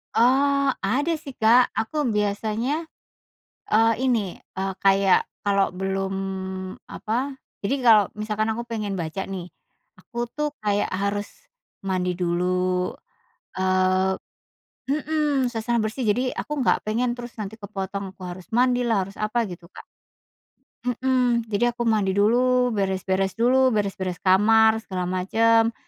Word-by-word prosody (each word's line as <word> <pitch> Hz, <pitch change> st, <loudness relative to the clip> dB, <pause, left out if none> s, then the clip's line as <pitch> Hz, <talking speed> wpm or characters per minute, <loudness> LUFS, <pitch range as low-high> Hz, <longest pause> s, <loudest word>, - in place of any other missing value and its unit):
Eee, 275 Hz, +4 st, +3 dB
ada 275 Hz, +12 st, 0 dB
sih 280 Hz, -3 st, -9 dB
Kak, 235 Hz, +3 st, +5 dB
aku 260 Hz, +6 st, -1 dB
biasanya, 220 Hz, +9 st, -1 dB, 0.8 s
eee, 225 Hz, +1 st, +5 dB
ini, 225 Hz, -8 st, 0 dB, 0.2 s
eee, 190 Hz, 0 st, -1 dB
kayak, 195 Hz, -1 st, +5 dB, 0.3 s
kalau 200 Hz, -2 st, +2 dB
belum, 190 Hz, +1 st, -2 dB, 0.8 s
apa, 260 Hz, +5 st, -3 dB, 0.3 s
jadi 245 Hz, +8 st, +1 dB
kalau 215 Hz, -3 st, +7 dB, 0.2 s
misalkan 215 Hz, +1 st, -1 dB
aku 235 Hz, +2 st, -3 dB
pengen 215 Hz, -4 st, -3 dB
baca 170 Hz, +3 st, -3 dB
nih. 185 Hz, -2 st, -6 dB, 0.5 s
Aku 240 Hz, 0 st, -5 dB
tuh, 300 Hz, 0 st, -1 dB
kayak 205 Hz, -1 st, 0 dB
harus, 200 Hz, +2 st, -1 dB, 0.6 s
mandi 180 Hz, -1 st, 0 dB
dulu, 180 Hz, +1 st, 0 dB, 0.6 s
eee 185 Hz, 0 st, +2 dB, 0.7 s
mhm, 295 Hz, -3 st, 0 dB
suasana 235 Hz, 0 st, -1 dB
bersih, 220 Hz, +3 st, -2 dB
jadi, 250 Hz, +5 st, +1 dB
aku 300 Hz, -, -7 dB
nggak -, -, +3 dB
pengen 240 Hz, +3 st, 0 dB
terus 240 Hz, -1 st, -9 dB
nanti 210 Hz, 0 st, -5 dB
kepotong, 195 Hz, -1 st, -5 dB
aku 190 Hz, -, -15 dB
harus 180 Hz, 0 st, -9 dB
mandilah, 245 Hz, -2 st, +2 dB
harus 195 Hz, +2 st, -12 dB
apa, 215 Hz, +3 st, -1 dB
gitu 175 Hz, -1 st, -10 dB
Kak. -, -, -12 dB, 1.0 s
Mhm, 245 Hz, -2 st, +1 dB
jadi 240 Hz, +3 st, +1 dB
aku 240 Hz, -, -3 dB
mandi 205 Hz, -4 st, +2 dB
dulu, 250 Hz, +4 st, +3 dB
beres-beres 190 Hz, -2 st, -1 dB
dulu, 255 Hz, +4 st, +3 dB
beres-beres 195 Hz, -3 st, -2 dB
kamar, 220 Hz, +4 st, +5 dB
segala 185 Hz, -3 st, -3 dB
macam. 225 Hz, +5 st, +3 dB
215 Hz, 130 wpm, -24 LUFS, 195-245 Hz, 1.0 s, kalau